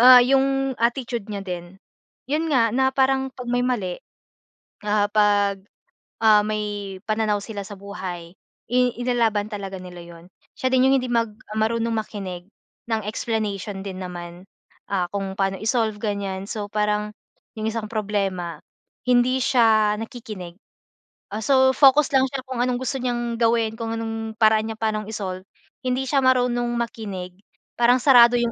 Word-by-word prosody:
ah, 250 +1 +10
'yong 270 0 +2
attitude 235 -2 -1
niya 200 -2 -4
din. 175 0 -6 0.6
'Yon 320 +2 +1
nga, 230 -4 +4
na 265 0 +3
parang 265 0 +2
'pag 250 - -8
may 245 0 +2
mali, 205 -8 -1 0.9
ah, 205 0 +3
'pag, 205 -2 +2 0.6
ah, 215 -1 +7
may 205 -2 -3
pananaw 215 -1 +1
sila 205 -3 -6
sa 205 - -8
buhay, 185 -4 -7 0.4
i 250 - +2 0.2
ilalaban 230 -4 +1
talaga 195 -2 -5
nila 180 -1 -10
'yon. 170 0 -13 0.3
Siya 260 - 0
din 260 0 +4
'yong 270 - +5
hindi 250 - -4
mag 230 -2 +1 0.3
marunong 230 +1 +1
makinig 195 -5 -5 0.4
ng 225 -1 0
explanation 210 -3 -3
din 190 -2 -6
naman, 175 0 -8 0.5
ah, 180 -3 +1
kung 195 -1 -3
paano 195 -1 -1
i-solve, 220 -1 0
ganyan. 200 -2 -3
So, 210 -2 -4
parang 210 0 0 0.5
'yong 215 - -1
isang 220 -1 -4
problema, 195 -5 -2 0.4
hindi 250 +1 +3
siya 220 -4 +4
nakikinig. 215 -7 -8 0.8
Ah, 215 - -3
so, 265 +1 +4
focus 280 +1 +6
lang 265 0 +5
siya 270 -1 -4
kung 255 -2 -3
anong 250 -1 0
gusto 270 +1 -2
niyang 240 -2 -2
gawin, 230 -1 +2
kung 225 0 -3
anong 225 0 -4
paraan 220 0 +4
niya 220 - -8
pa'nong 215 -1 -1
i-solve, 190 -3 -5 0.4
hindi 255 +1 0
siya 280 - +3
marunong 245 -2 +2
makinig. 195 -6 -5 0.4
Parang 240 +1 +5
sarado 245 -3 +7
'yong 235 -1 0
220 Hz, 150 wpm, -23 LUFS, 200-245 Hz, 0.9 s, ah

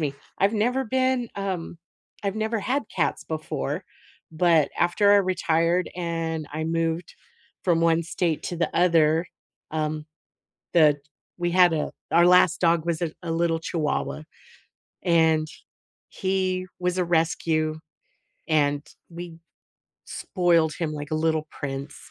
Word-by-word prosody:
me, 145 -3 -1 0.2
I've 200 +3 +3
never 245 +5 +1
been 255 0 +1
um, 185 -4 -3 0.5
I've 200 -1 -1
never 220 +1 -1
had 260 +7 -1
cats - - 0
before, - - -4 0.5
but 160 -2 +3
after 200 +4 +4
I - - +7
retired 180 -2 +1
and 165 -3 -3
I 155 +1 -3
moved 165 +1 -1 0.5
from 170 -3 +2
one 165 0 +3
state 170 -1 -1
to 175 - -3
the 170 - -1
other, 165 -1 +3 0.4
um, 155 -1 -2 0.7
the 150 -4 +5 0.4
We 175 0 -1
had 180 -2 +6
a 155 - -1 0.2
Our 175 +1 +6
last 180 -1 +5
dog 170 -2 +3
was 170 -1 -1
a 165 -2 -1
a 170 - -4
little 165 0 +1
Chihuahua, 155 -1 -2 0.8
and 160 -3 +3 0.6
he 185 -1 -1
was 180 0 0
a 180 - +2
rescue, 160 -2 0 0.7
and 145 -2 +1 0.2
we 170 -1 -8 0.7
spoiled 170 -4 +1
him 160 -3 -2
like 145 -1 -6
a - - 0
little 160 -1 0
prince. 135 0 -6
170 Hz, 135 wpm, -25 LUFS, 160-180 Hz, 0.8 s, I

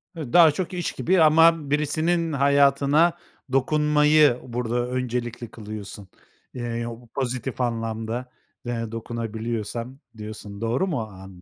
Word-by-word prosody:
Hı, 155 -7 -7
daha 170 -3 +8
çok 180 +4 -4
iş 175 -2 -2
gibi 180 0 +1
ama 160 -1 +5
birisinin 160 +3 +1
hayatına 140 +4 +3 0.3
dokunmayı 150 0 +4
burada 120 0 -2
öncelikli 120 -2 -3
kılıyorsun. 105 -2 -8 0.5
Eee, 125 - -6
yo 120 0 -3
bu 120 - -18
pozitif 130 0 -3
anlamda 115 +1 -3 0.3
de 115 -2 -3
dokunabiliyorsan 115 +2 -4 0.2
diyorsun, 105 -1 -8
doğru 120 +11 0
mu 160 -7 -1
o 110 - -3
an 95 -2 -13
125 Hz, 125 wpm, -24 LUFS, 115-150 Hz, 0.5 s, daha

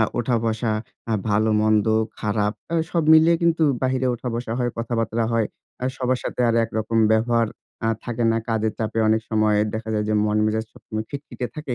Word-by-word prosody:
আ - - +5 0.2
উঠা-বসা 115 -2 0 0.4
আ - - +1 0.2
ভালো-মন্দ, 110 0 +2 0.3
খারাপ 105 -1 0 0.2
অ্যা 170 - -1
সব 170 -2 +1
মিলিয়ে 160 +1 +6
কিন্তু 165 -1 +2 0.2
বাহিরে 130 0 +1
উঠা-বসা 120 -1 -4
হয়, 120 -1 0
কথাবার্তা 115 -1 -1
হয়। 115 -2 +2 0.4
আ - - 0
সবার 130 0 0
সাথে - - -4
আর 115 - +2
একরকম 110 0 -2
ব্যবহার 115 +1 +2 0.4
আ - - +2 0.2
থাকে 120 -1 -2
না। 115 - +2
কাজের 110 -1 0
চাপে 110 0 -2
অনেক 110 0 +3
সময় 110 -1 +3 0.2
দেখা 110 0 -5
যায়, 105 0 0
যে 110 - +1
মন-মেজাজ 105 +1 +1
সবসময় 110 0 -6
খিটখিটে 140 -3 -5
থাকে। 145 -5 -4
115 Hz, 175 wpm, -23 LUFS, 110-125 Hz, 0.4 s, মিলিয়ে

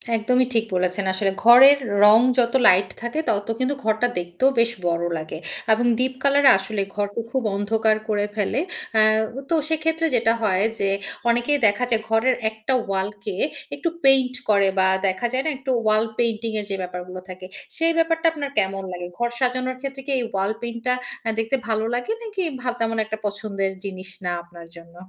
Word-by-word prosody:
একদমই 250 +3 +2
ঠিক 225 -1 +2
বলেছেন। 185 +2 0
আসলে 195 +1 0
ঘরের 265 +4 +9 0.3
রং 210 +2 +8 0.2
যত 235 -2 +2
লাইট 185 +1 +5
থাকে, 240 +6 -3
ততো 205 +2 -1
কিন্তু 260 +2 0
ঘরটা 220 +2 +1
দেখতেও 175 +9 0
বেশ 230 0 +3 0.2
বড় 170 0 0
লাগে 155 0 -6 0.4
এবং 235 +3 0
ডীপ 260 +1 0
কালারে 280 0 +5
আসলে 200 +2 -3
ঘরটা 205 +2 -2
খুব 265 -1 -1
অন্ধকার 215 +2 +1
করে 205 -1 +1
ফেলে। 210 +6 0 0.4
আ - - +7 0.5
তো 335 - +2
সেক্ষেত্রে 320 +1 0
যেটা 225 -1 +3
হয় 195 -3 +1 0.2
যে, 195 - +1 0.4
অনেকেই 240 +5 +2
দেখা 205 +4 +1
যায় 225 -2 +2
ঘরের 225 +3 +2
একটা 220 +4 -3
ওয়ালকে 195 0 -3 0.4
একটু 335 - -2
পেইন্ট 265 -2 +4 0.2
করে 200 -2 +4
বা 190 - +4 0.2
দেখা 190 +5 -1
যায় 260 +1 0
না? - - +1
একটু 265 0 -4
ওয়াল 215 0 +4
পেইন্টিং 230 -1 -1
এর 210 - -5
যে, 195 - -2
ব্যাপারগুলা 180 0 -7
থাকে। 185 0 -9 0.3
সেই 330 0 +3
ব্যাপারটা 330 0 +1
আপনার 290 -3 -4
কেমন 195 -1 -1
লাগে? 175 0 -6
ঘর 240 0 0
সাজানোর 255 0 -1
ক্ষেত্রে 275 0 -6
কি 280 - -3
এই 250 - -1
ওয়াল 195 +1 0
পেইন্টটা 235 +1 -2 0.3
আ - - +2
দেখতে 225 +4 0
ভালো 220 -1 0
লাগে, 245 - -3
নাকি 420 -4 -4 0.2
ভা 250 - -2
তেমন 225 0 -1
একটা 220 0 -5
পছন্দের 200 -1 -2
জিনিস 190 -1 -6 0.2
না 175 - 0
আপনার 170 -1 -14
জন্য? 170 0 -15
220 Hz, 180 wpm, -22 LUFS, 195-255 Hz, 0.5 s, ঘরের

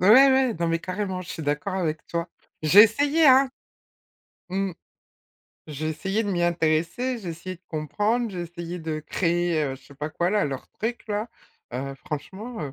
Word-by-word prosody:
Ouais, 185 - +4
ouais, 265 0 +7
non 170 0 -1
mais 165 0 0
carrément 185 0 -3
je 175 - -13
suis 160 - -5
d'accord 150 +6 -1
avec 160 -5 -1
toi. 170 0 -2 0.3
J'ai 180 +7 +9
essayé, 290 +8 +4
hein. 265 0 +7 1.0
Mmh. 195 +1 -1 1.0
J'ai 155 +1 -4
essayé 195 +7 -1
de 205 - -2
m'y 175 -2 0
intéresser, 170 +9 +1
j'ai 195 -5 -7
essayé 185 +3 -6
de 170 - -35
comprendre, 210 +10 0
j'ai 180 -3 -4
essayé 175 +1 -6
de 160 -2 -3
créer, 170 0 0
heu, 135 -2 -2
je 130 - -15
sais 140 - -15
pas 150 +3 -4
quoi 175 +2 0
là, 210 0 +2
leur 135 -2 -4
truc-là, 220 -1 -3 0.4
heu, 135 +2 -4
franchement, 190 - -6
heu, 140 -3 -5
175 Hz, 180 wpm, -25 LUFS, 155-210 Hz, 1.0 s, J'ai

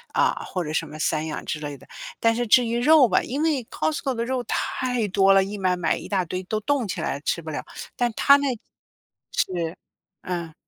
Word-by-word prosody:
啊， - - +1
或 180 - -3
者 150 - -5
什 - - 0
么 155 - -10
散 155 0 0
养 155 - -4
之 150 - -3
类 145 -2 -6
的。 - - -17 0.3
但 230 0 +3
是 240 - -1
至 240 +2 +5
于 235 +1 -1
肉 285 +1 +6
吧 185 - +3
因 275 +5 -3
为 300 -6 +1
costco 290 -4 -1
的 235 0 -2
肉 255 -1 -2
太 250 -4 -1
多 195 0 +4
了， 195 0 +6
一 200 +2 -4
买 185 -2 +1
买 170 -2 0
一 170 - -8
大 190 -2 +1
堆 185 +3 -4
都 215 +3 -2
冻 265 0 0
起 190 -2 -4
来 140 -3 -2
吃 160 - -1
不 160 - -10
了， 150 - -4 0.3
但 240 -2 0
它 280 0 +7
那 280 -1 0 0.8
是， 170 -2 -1 0.5
嗯。 170 -3 -4
200 Hz, 265 characters per minute, -24 LUFS, 170-250 Hz, 0.8 s, 它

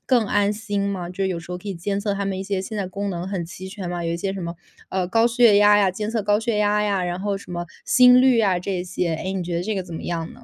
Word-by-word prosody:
更 245 -4 +3
安 205 0 +2
心 210 -1 -3
吗？ 185 -3 -4
就 180 +2 -4
是 190 - +1
有 180 - -2
时 170 - -12
候 180 - -3
可 200 +3 -9
以 195 - -3
监 195 +4 -2
测 205 -1 -1
他 200 0 -2
们 195 -1 -2
一 - - -3
些 195 -1 -2
现 215 +3 -6
在 200 -2 -2
功 200 +2 -4
能 175 -1 -4
很 190 -3 -3
齐 185 +2 -9
全 190 -3 -6
吗？ 175 -1 -3
有 165 - -1
一 - - -1
些 190 +3 -2
什 195 - -5
么， 170 0 -4 0.4
嗯， 185 -2 -1
高 225 +4 +3
血 235 -3 +5
压 205 0 +6
呀 195 -2 +3
监 210 +3 -3
测 225 -1 0
高 205 +1 +2
血 225 -2 -1
压 210 0 +2
呀， 200 -3 0
然 175 +1 -3
后 200 0 -1
什 190 - -13
么 175 0 -3 0.2
心 250 0 +7
率 255 -3 +5
啊， 190 -4 +2
这 180 0 -3
些， 180 -2 -2
诶， 185 +4 -4
你 190 -1 -2
觉 170 0 -2
得 175 - -1
这 215 +3 -2
个 190 - -1
怎 175 - -9
么 - - -6
样 165 -2 -2
呢？ - - -12
195 Hz, 345 characters per minute, -23 LUFS, 180-210 Hz, 0.4 s, 心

